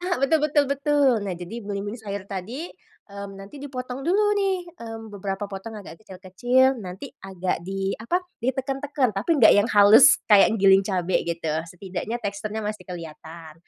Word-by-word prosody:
Ah 360 0 -1
betul 275 +4 +3
betul 295 -1 +2
betul. 280 0 +2 0.2
Nah 195 - -3
jadi 175 +6 -8
belimbing 205 +1 -5
sayur 200 -2 -6
tadi, 215 - -5 0.5
mmm, 200 0 -7
nanti 195 +7 -11
dipotong 255 -1 -6
dulu 410 +4 +3 0.2
nih, 390 -1 +1 0.2
mmm, 225 -1 -7
beberapa 195 0 -4
potong 195 +4 -7
agak 190 - -11
kecil-kecil. 210 +6 +1 0.2
Nanti 185 +9 -7 0.2
agak 185 -2 -2
di 195 0 -2
apa 345 - +1 0.2
ditekan 265 +2 -2
tekan, 280 -3 +1
tapi 200 +11 -2
enggak - - +7
yang 205 - +2
halus 205 +6 +8 0.2
kayak 210 +2 +6
giling 195 0 +6
cabe 185 -2 0
gitu. 165 -2 -2 0.2
Setidaknya 190 +5 -5
teksturnya 215 0 -5
masih 210 0 -5
kelihatan. 165 -2 -9
205 Hz, 160 wpm, -24 LUFS, 190-260 Hz, 0.5 s, halus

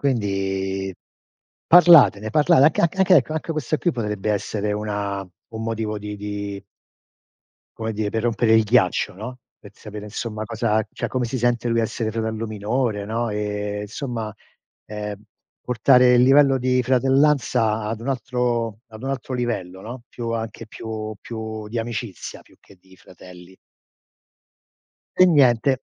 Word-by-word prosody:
Quindi 95 -6 -1 0.7
parlatene 160 - +7
parla 145 -1 +4
anc 145 +3 +5
anch 190 +3 +2
ecco, 155 -4 +5
anche 160 +1 -3
questo 155 0 -1
qui 175 - 0
potrebbe 105 -4 -2
essere 105 0 -2
una 105 -1 -3 0.3
un 110 0 -6
motivo 110 -1 -3
di 105 0 -6
di 100 -1 -5 1.1
come 110 0 -3
dire, 105 -1 -2
per 110 - -1
rompere 115 -1 +2
il 110 0 +5
ghiaccio, 105 -6 +2
no, 125 +5 -8 0.2
per - - -15
sapere 105 0 -9
insomma 110 0 -5
cosa 110 -1 0
cioè, - - -4
come 130 -1 -1
si 125 +2 -3
sente 120 0 +1
lui 115 0 +2
a - - +2
essere 110 0 -3
fratello 110 0 -3
minore, 110 +1 -2
no, 115 +3 -2
e 105 0 -3
insomma 110 0 -5 0.5
ehm, 105 -1 -6 0.4
portare 125 +1 +4
il 120 - +5
livello 135 0 +5
di 125 0 +1
fratellanza 130 -3 +2
ad 110 0 -3
un 135 - -4
altro 120 -3 -1
ad 110 +1 -11
un 135 - -4
altro 135 -1 -4
livello, 95 -7 -3
no, 120 +3 -8
più 115 -1 -5
anche 115 0 -5
più 110 -1 -6
più 110 -2 -6
di 115 +2 -3
amicizia, 115 -3 -6
più - - -24
che 100 - -19
di 95 0 -20
fratelli. 90 0 -15 1.7
E - - +10
niente. 130 -4 +4
110 Hz, 150 wpm, -22 LUFS, 105-125 Hz, 1.7 s, E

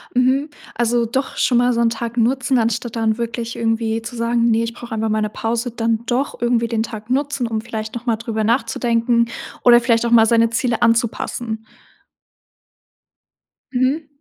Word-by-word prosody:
Mhm. 260 +4 +2 0.3
Also, 240 0 +1
doch 265 +4 -3
schon 245 - +2
mal 245 0 +3
so 235 - 0
'n 230 - +4
Tag 235 +1 -5
nutzen, 255 +2 +2
anstatt 230 +1 -1
dann 220 -1 +1
wirklich 235 0 -4
irgendwie 225 0 -1
zu 235 +2 -7
sagen: 235 0 +1
„Ne, 225 +1 +2
ich 230 0 -4
brauche 240 -1 -8
einfach 220 0 -1
mal 215 0 +1
'ne 210 - -1
Pause“, 230 +3 -2
dann 225 -1 -1
doch 255 +4 -1
irgendwie 235 -1 +1
den 225 -1 -1
Tag 220 0 -8
nutzen, 275 -2 0
um 220 -1 -2
vielleicht 220 -1 -6
noch 240 +2 -6
mal 230 -2 +1
darüber 220 -1 -3
nachzudenken 235 0 +1 0.4
oder 240 -1 +7
vielleicht 235 -1 +1
auch 235 - -1
mal 225 -1 +7
seine 230 0 +4
Ziele 230 0 0
anzupassen. 230 0 0 2.1
Mhm. 270 +4 0
235 Hz, 175 wpm, -20 LUFS, 225-245 Hz, 2.1 s, oder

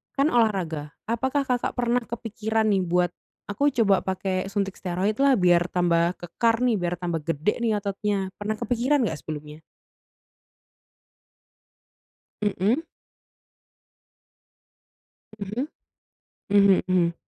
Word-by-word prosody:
kan 275 +1 +3
olahraga, 185 -10 +1 0.2
apakah 265 +5 0
Kakak 250 -1 0
pernah 245 0 +1
kepikiran 220 -1 -2
nih 190 -2 +2
buat, 175 0 +2 0.4
"Aku 280 +8 +1 0.2
coba 195 -2 +4
pake 190 0 -2
suntik 200 -2 -1
steroid 190 +5 -1
lah, 275 -1 +5
biar 175 -1 +4
tambah 175 0 +2
kekar 225 +7 0
nih, 245 -3 +3
biar 175 0 -1
tambah 170 -2 -2
gede 165 +7 -1
nih 225 -2 +2
ototnya." 200 -1 -2
Pernah 210 +1 -2
kepikiran 245 +4 +1
nggak 155 -5 -4
sebelumnya? 150 0 -7 2.8
Mhm. 210 - +1 2.6
Mhm. 215 +8 -3 0.8
Mhm 200 -1 +5
mhm. 175 -2 +2
200 Hz, 110 wpm, -25 LUFS, 175-230 Hz, 2.8 s, lah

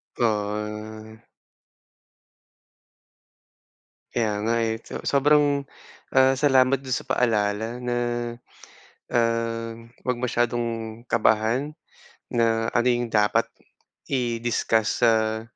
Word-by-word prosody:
To, 120 - -1
ah. 105 +1 -4 2.9
Kaya 105 -3 0
nga, 115 +1 +1
eh. 115 -1 0
So - - -7
sobrang, 145 0 +3 0.5
ah, 130 0 +5
salamat 135 -1 +3
do'n 130 - -7
sa 130 - -3
paalala 110 -2 0
na, 125 -1 -2 1.1
ah, 115 -1 0 0.3
wag 125 -1 0
masyadong 115 -2 -1
kabahan, 115 +6 +2 0.6
na 115 -1 +1
ano 120 +1 +1
'yong 120 -1 0
dapat, 105 -1 +3 0.6
i-discuss 120 -3 0
sa 110 -1 +3
115 Hz, 90 wpm, -24 LUFS, 110-125 Hz, 2.9 s, ah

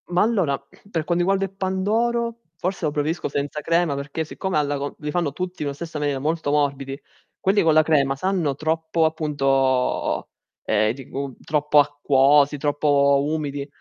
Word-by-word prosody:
Ma 175 0 +2
allora, 190 -11 +1
per 165 +4 -6
quanto 175 - -1
riguarda 195 +1 +2
il 195 - -10
pandoro, 225 +5 0 0.2
forse 185 -1 -2
lo 150 - +1
preferisco 150 +3 -1
senza 145 +1 -3
crema 165 -2 +1
perché 140 +3 -4
siccome 190 +3 -3
alla 145 -1 0
co 140 +1 -4
li 150 - -4
fanno 170 -3 0
tutti 180 +2 -5
nella 140 -1 -2
stessa 160 0 -6
maniera, 145 -2 -1
molto 155 +1 -1
morbidi, 140 -2 -1 0.4
quelli 195 +2 +3
con 160 -1 +4
la 155 - +6
crema 140 -3 +2
sanno 170 -3 0
troppo 160 +2 0
appunto 135 -5 +1 0.4
ehm, 110 0 +2
di 130 0 -11
gu 140 -1 -5
troppo 150 0 +2
acquosi, 145 0 +3
troppo 140 -1 +2
umidi. 145 -2 -3
150 Hz, 165 wpm, -23 LUFS, 140-170 Hz, 0.4 s, la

